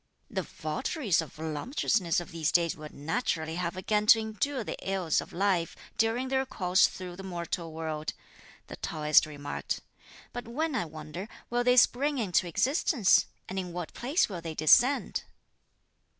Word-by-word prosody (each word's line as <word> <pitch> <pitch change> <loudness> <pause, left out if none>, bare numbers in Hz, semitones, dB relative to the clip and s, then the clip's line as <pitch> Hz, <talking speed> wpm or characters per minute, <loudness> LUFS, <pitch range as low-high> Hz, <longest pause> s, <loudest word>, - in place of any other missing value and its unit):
"The - - -1
votaries 215 - -1
of 160 - -9
voluptuousness 165 - 0
of 175 - -8
these 165 -2 0
days 170 -2 +2
will 155 -1 -9
naturally 160 - -2
have 180 0 -2
again 210 +3 0
to 225 - +8
endure 225 +4 -2
the - - -4
ills 190 -5 0
of - - -11
life 185 -2 +1 0.2
during 230 +4 +1
their 265 0 +2
course 185 -7 +3
through 180 -1 -8
the - - -7
mortal 170 -2 -4
world," 155 -1 -4 0.5
the - - -9
Taoist 150 -1 +3
remarked; 145 -1 -4 0.5
"but 245 -1 -6
when, 305 +6 -1
I 225 -9 0
wonder, 155 +4 -7 0.2
will 240 0 +2
they 250 0 +4
spring 280 +4 +4
into 190 -6 +1
existence? 250 - +3 0.2
and 190 +1 -3
in 180 -2 -5
what 175 -2 -5
place 275 +9 +1
will 180 -5 -6
they 165 -1 -5
descend?" 245 - +4
185 Hz, 160 wpm, -29 LUFS, 160-240 Hz, 0.5 s, to